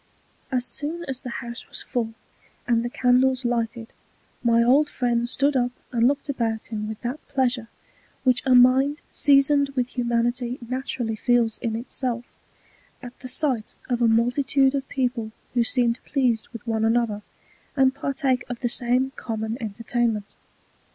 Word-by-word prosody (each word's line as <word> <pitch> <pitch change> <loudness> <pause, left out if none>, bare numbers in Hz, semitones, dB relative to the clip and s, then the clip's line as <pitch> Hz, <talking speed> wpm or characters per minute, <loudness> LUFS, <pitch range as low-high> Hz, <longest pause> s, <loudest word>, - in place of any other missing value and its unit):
As 250 -2 0
soon 315 +6 -5
as 265 -1 -4
the 255 - -6
House 235 0 -6
was - - -7
full, 225 -2 -3 0.5
and 235 -1 +2
the 240 - -2
Candles 255 +1 +2
lighted, 230 -1 -2 0.5
my 235 -1 +4
old 280 +5 +4
Friend 240 -1 0
stood 280 +3 +1
up 245 -1 +2 0.2
and 235 -1 +3
looked 285 +2 0
about 230 -5 -2
him 215 -1 -3
with 220 - -6
that 250 +5 -3
Pleasure, 250 -3 0 0.6
which 255 -2 +3
a 260 -2 +4
Mind 265 +4 +5
seasoned 280 0 +4
with 250 -2 0
Humanity 240 0 -1
naturally 250 -3 -3
feels 235 0 +2
in 230 -3 -2
its 235 +3 -7
self, 245 -2 -2 0.8
at 245 0 -10
the 255 - -8
sight 255 -4 0
of 245 -1 0
a 235 - +5
Multitude 260 +4 +3
of 275 -1 -3
People 245 -4 -2 0.2
who 240 -1 +3
seem 235 -1 +2
pleased 245 -2 0
with 230 -2 -10
one 225 -1 0
another, 225 -2 +1 0.6
and 265 -1 +4
partake 275 -2 -1
of 245 -1 -5
the 240 - 0
same 250 +2 +2
common 220 -1 -3
Entertainment. 225 0 -2
245 Hz, 160 wpm, -24 LUFS, 230-265 Hz, 0.8 s, Mind